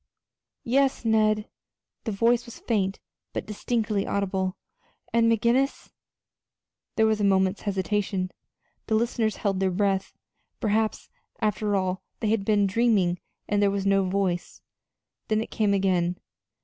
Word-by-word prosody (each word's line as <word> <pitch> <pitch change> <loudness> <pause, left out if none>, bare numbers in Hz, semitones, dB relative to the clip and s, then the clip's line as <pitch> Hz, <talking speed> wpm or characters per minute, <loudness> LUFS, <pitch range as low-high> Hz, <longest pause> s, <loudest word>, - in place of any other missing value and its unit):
"Yes, 265 0 +1
Ned." 215 -1 +3 0.6
The 225 - -1
voice 235 +4 +2
was 235 - -10
faint, 195 -4 -1 0.3
but - - -3
distinctly 215 -1 -1
audible. 190 -1 -1 0.6
"And 230 0 +4
McGinnis?" 235 +5 +1 1.0
There 220 - +4
was 220 -1 +2
a - - +1
moment's 190 0 +2
hesitation. 190 -1 -1 0.6
The 220 - +2
listeners 225 -1 +1
held 195 -2 -1
their 190 -1 +2
breath 195 +1 0 0.4
perhaps, 220 -1 0 0.3
after 210 -1 0
all, 185 -1 -1 0.2
they 220 - 0
had 215 -3 +1
been 205 -1 +3
dreaming 200 -4 +2 0.3
and 205 0 +1
there 200 - +4
was 195 0 -2
no 195 0 +4
voice! 185 -2 -2 0.6
Then 215 0 +2
it 225 - -4
came 210 -2 +1
again. 180 -3 +1
205 Hz, 135 wpm, -26 LUFS, 190-220 Hz, 1.0 s, And